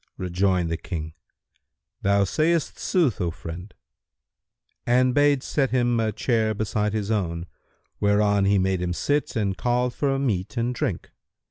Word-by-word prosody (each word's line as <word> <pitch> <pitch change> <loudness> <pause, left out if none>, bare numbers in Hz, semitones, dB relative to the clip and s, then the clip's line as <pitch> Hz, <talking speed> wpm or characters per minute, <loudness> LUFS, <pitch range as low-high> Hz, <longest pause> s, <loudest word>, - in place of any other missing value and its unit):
Rejoined 90 -1 0
the 80 - -1
King, 80 -2 -6 0.9
"Thou 100 0 +3
sayst 155 - 0
sooth, 165 - +1
O 85 - 0
friend," 85 +4 -8 1.1
and 125 +1 +3
bade 145 -1 +3
set 135 -3 0
him 120 -2 +1
a 110 -1 +1
chair 110 0 0
beside 105 0 -1
his 110 -1 -2
own, 85 -5 -1 0.5
whereon 100 -1 +3
he 100 +1 +3
made 95 -1 +1
him 90 -1 -1
sit 145 +9 -1
and 100 -4 0
called 125 +2 0
for 135 0 0
meat 110 -6 -2
and 120 +2 0
drink. - - -3
105 Hz, 145 wpm, -24 LUFS, 95-125 Hz, 1.1 s, Thou